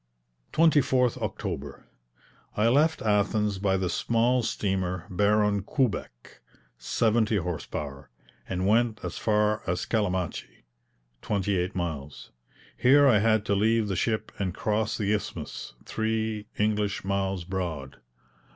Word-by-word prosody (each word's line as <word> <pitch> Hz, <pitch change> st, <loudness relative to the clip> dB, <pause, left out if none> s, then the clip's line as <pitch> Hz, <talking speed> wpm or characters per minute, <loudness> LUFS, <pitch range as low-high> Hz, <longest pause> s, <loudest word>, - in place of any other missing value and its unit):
24th 140 Hz, -6 st, +3 dB
October. 70 Hz, 0 st, -5 dB, 0.7 s
I 110 Hz, +2 st, +4 dB
left 150 Hz, +6 st, +3 dB
Athens 105 Hz, -1 st, +1 dB
by 95 Hz, -1 st, +1 dB
the 95 Hz, -1 st, -1 dB
small 120 Hz, +6 st, +1 dB
steamer 95 Hz, -5 st, -2 dB
Baron 105 Hz, +2 st, +2 dB
Kubeck, 100 Hz, -, -3 dB, 0.4 s
seventy 110 Hz, -, +1 dB
horse 90 Hz, -4 st, -3 dB
power, 70 Hz, -2 st, -6 dB, 0.4 s
and 95 Hz, 0 st, -1 dB
went 115 Hz, +2 st, +2 dB
as -, -, -5 dB
far 105 Hz, 0 st, +2 dB
as 90 Hz, 0 st, -1 dB
Calamachi 95 Hz, -, -2 dB, 0.6 s
(twenty 100 Hz, -1 st, 0 dB
eight 90 Hz, +2 st, -1 dB
miles). 80 Hz, -6 st, -5 dB, 0.4 s
Here 140 Hz, +3 st, +5 dB
I 115 Hz, -6 st, +5 dB
had 110 Hz, 0 st, +2 dB
to 100 Hz, -, +1 dB
leave 110 Hz, +1 st, +2 dB
the 95 Hz, -, -1 dB
ship 110 Hz, +4 st, -1 dB
and 95 Hz, -3 st, -2 dB
cross 110 Hz, +1 st, -1 dB
the 105 Hz, -1 st, 0 dB
Isthmus, 100 Hz, -, -5 dB
three 110 Hz, -1 st, -2 dB
English 105 Hz, -1 st, 0 dB
miles 95 Hz, -2 st, -1 dB
broad. 85 Hz, -7 st, -4 dB
105 Hz, 125 wpm, -27 LUFS, 95-110 Hz, 0.7 s, Here